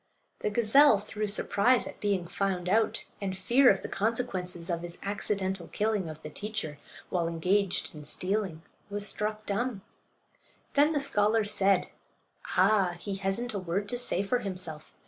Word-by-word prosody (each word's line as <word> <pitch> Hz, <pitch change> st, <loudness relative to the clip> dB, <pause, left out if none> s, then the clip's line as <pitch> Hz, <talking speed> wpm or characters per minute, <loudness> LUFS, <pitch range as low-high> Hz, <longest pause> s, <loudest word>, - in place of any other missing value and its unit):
The -, -, -1 dB
gazelle, 235 Hz, +4 st, +6 dB
through 210 Hz, +1 st, -4 dB
surprise 215 Hz, +4 st, +3 dB
at -, -, -9 dB
being 200 Hz, -4 st, 0 dB
found 185 Hz, -1 st, -1 dB
out 220 Hz, +4 st, +2 dB, 0.2 s
and 190 Hz, -2 st, -3 dB
fear 250 Hz, +5 st, +5 dB
of 195 Hz, -, +2 dB
the -, -, -3 dB
consequences 190 Hz, -6 st, -2 dB
of 170 Hz, -2 st, -2 dB
his 175 Hz, 0 st, -6 dB
accidental 195 Hz, -3 st, -2 dB
killing 210 Hz, -5 st, -1 dB
of 155 Hz, 0 st, -9 dB
the 150 Hz, -, -6 dB
teacher, 210 Hz, -8 st, -5 dB, 0.3 s
while 175 Hz, -3 st, +1 dB
engaged 180 Hz, +4 st, 0 dB
in 150 Hz, -1 st, -9 dB
stealing, 185 Hz, 0 st, -1 dB, 0.3 s
was 205 Hz, 0 st, -3 dB
struck 215 Hz, 0 st, -2 dB
dumb. 210 Hz, 0 st, -2 dB, 0.9 s
Then 295 Hz, +3 st, +4 dB
the 295 Hz, -, +1 dB
scholars 215 Hz, -5 st, +2 dB
said: 195 Hz, -2 st, +2 dB, 0.7 s
"Ah! 190 Hz, -1 st, +4 dB
he 195 Hz, 0 st, -4 dB
hasn't 200 Hz, +5 st, -1 dB
a 200 Hz, -, -2 dB
word 185 Hz, +3 st, -2 dB
to 245 Hz, -, -2 dB
say 200 Hz, -6 st, +1 dB
for 245 Hz, +5 st, +1 dB
himself. 180 Hz, -7 st, -6 dB
200 Hz, 160 wpm, -29 LUFS, 180-215 Hz, 0.9 s, gazelle